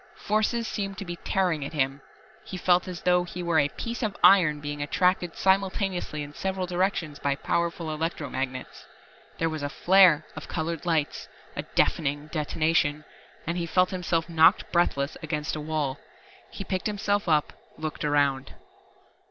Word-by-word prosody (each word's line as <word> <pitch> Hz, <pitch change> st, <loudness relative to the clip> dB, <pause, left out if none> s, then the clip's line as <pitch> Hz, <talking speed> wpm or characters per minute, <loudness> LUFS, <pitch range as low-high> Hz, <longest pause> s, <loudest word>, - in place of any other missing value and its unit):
Forces 215 Hz, +2 st, 0 dB
seemed 195 Hz, -2 st, -4 dB
to 195 Hz, -, -6 dB
be 175 Hz, -1 st, -6 dB
tearing 180 Hz, -6 st, 0 dB
at 140 Hz, -, -6 dB
him. 135 Hz, -1 st, -1 dB, 0.4 s
He 190 Hz, -, -7 dB
felt 180 Hz, 0 st, +2 dB
as 180 Hz, -2 st, -6 dB
though 180 Hz, 0 st, +3 dB
he 175 Hz, 0 st, -6 dB
were 170 Hz, -2 st, +2 dB
a 145 Hz, 0 st, +2 dB
piece 235 Hz, -, -5 dB
of 215 Hz, -4 st, -2 dB
iron 170 Hz, -7 st, +6 dB
being 145 Hz, 0 st, -5 dB
attracted 180 Hz, +3 st, +1 dB
simultaneously 190 Hz, -4 st, 0 dB
in 145 Hz, 0 st, -9 dB
several 190 Hz, +2 st, -2 dB
directions 175 Hz, -4 st, -1 dB
by 140 Hz, -1 st, 0 dB
powerful 170 Hz, +1 st, -1 dB
electro 160 Hz, -1 st, -3 dB
magnets. 130 Hz, -1 st, -5 dB, 0.5 s
There 165 Hz, -, +1 dB
was 155 Hz, -2 st, -4 dB
a 145 Hz, -, -2 dB
flare 180 Hz, 0 st, +5 dB
of 155 Hz, -, -8 dB
colored 165 Hz, 0 st, -3 dB
lights, 160 Hz, -3 st, 0 dB, 0.3 s
a -, -, -2 dB
deafening 145 Hz, -1 st, +1 dB
detonation 155 Hz, -1 st, 0 dB, 0.4 s
and 170 Hz, +2 st, -2 dB
he 170 Hz, -, -2 dB
felt 180 Hz, +2 st, +2 dB
himself 170 Hz, -3 st, -1 dB
knocked 165 Hz, +3 st, +4 dB
breathless 155 Hz, -5 st, +1 dB
against 150 Hz, -2 st, -3 dB
a 155 Hz, -, -4 dB
wall. 150 Hz, -3 st, -2 dB, 0.5 s
He 200 Hz, -, -7 dB
picked 185 Hz, 0 st, -2 dB
himself 205 Hz, -2 st, -1 dB
up, 150 Hz, -1 st, +2 dB, 0.2 s
looked 155 Hz, 0 st, -5 dB
around. 140 Hz, -2 st, +1 dB
165 Hz, 160 wpm, -26 LUFS, 150-185 Hz, 0.5 s, iron